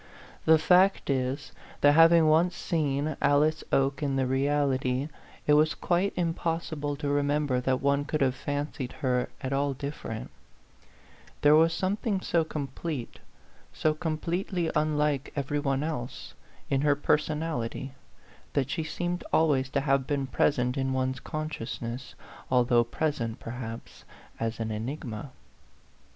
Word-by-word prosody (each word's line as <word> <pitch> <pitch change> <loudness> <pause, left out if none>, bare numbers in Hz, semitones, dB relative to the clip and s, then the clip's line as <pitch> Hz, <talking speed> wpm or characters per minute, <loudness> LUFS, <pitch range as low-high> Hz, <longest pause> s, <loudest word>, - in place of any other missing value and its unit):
The 160 0 +7
fact 180 0 +4
is, 135 +2 -2 0.3
that 145 - +7
having 165 +1 +7
once 165 +3 +3
seen 150 -2 -1
Alice 155 +2 +3
Oke 135 +1 +2
in 140 -2 0
the 135 -1 +1
reality, 135 0 +1 0.4
it 150 - +4
was 155 +1 +4
quite 180 +3 +1
impossible 165 -3 -2
to 145 0 -4
remember 145 -2 +1
that 130 0 0
one 140 0 +2
could 155 0 -2
have 130 -2 +3
fancied 145 -1 -4
her 125 -1 +1
at 130 -1 -2
all 140 0 0
different: 135 -5 -6 1.1
there 145 +1 +6
was 165 +1 +5
some 190 +4 -1
thing 210 -4 -1
so 170 -3 +1
complete, 145 -2 -5 0.5
so 155 - +1
completely 170 +2 -2
unlike 150 -2 +1
every 145 +1 -1
one 140 -1 0
else, 150 -6 -5 0.3
in 135 -1 +1
her 145 -1 +3
personality, 150 -4 -1 0.6
that 135 -1 0
she 160 - -1
seemed 175 +3 -3
always 140 -5 +3
to 140 - 0
have 135 -2 +1
been 140 -2 0
present 125 -1 +1
in 135 0 0
one's 130 0 -1
con 155 +2 -4
sciousness, 120 -2 -6 0.3
although 120 -2 +4
present, 120 -2 -2
perhaps, 115 -1 -7 0.4
as 115 0 -2
an 110 -1 -2
enigma. 115 +2 -5
145 Hz, 140 wpm, -28 LUFS, 130-155 Hz, 1.1 s, The